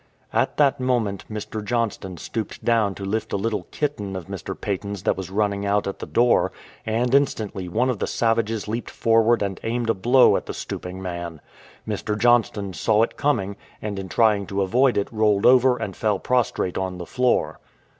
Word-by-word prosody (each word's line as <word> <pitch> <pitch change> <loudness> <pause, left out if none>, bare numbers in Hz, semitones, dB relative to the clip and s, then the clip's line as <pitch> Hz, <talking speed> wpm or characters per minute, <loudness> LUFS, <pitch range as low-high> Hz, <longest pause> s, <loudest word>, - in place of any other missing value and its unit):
At - - +1
that 140 -3 +3
moment 120 -6 0
Mr. 110 0 -5
Johnston 105 -5 -2
stooped 110 +5 -5
down 110 -4 +2
to 100 - -6
lift 110 +3 -2
a - - +2
little 105 +1 -2
kitten 105 -10 -3
of 90 -3 -5
Mr. - - -6
Paton's 100 0 -4
that - - +2
was 95 -2 -6
running 100 0 0
out 100 0 +1
at 100 - -4
the - - -6
door, 120 0 +3 0.4
and 120 +3 0
instantly 110 -9 +1
one 115 +8 +1
of 125 -6 -1
the - - -1
savages 115 -2 0
leaped 115 +3 -3
forward 115 0 +3
and 95 -2 -3
aimed 115 0 0
a - - +1
blow 125 +6 +5
at - - -6
the - - -5
stooping 90 +1 -6
man. 85 -3 -5 0.5
Mr. 105 0 -2
Johnston 110 -4 +2
saw 105 +8 +2
it - - -2
coming, 100 -9 0 0.2
and 105 -2 -4
in 95 -1 -6
trying 105 -2 +2
to 100 0 0
avoid 125 +7 +3
it 100 - +1
rolled 105 -2 +2
over 125 0 +6
and 95 -6 -5
fell 105 -3 +1
prostrate 120 -6 0
on 95 -1 -3
the 90 - -6
floor. 125 +3 0
105 Hz, 190 wpm, -23 LUFS, 95-120 Hz, 0.5 s, over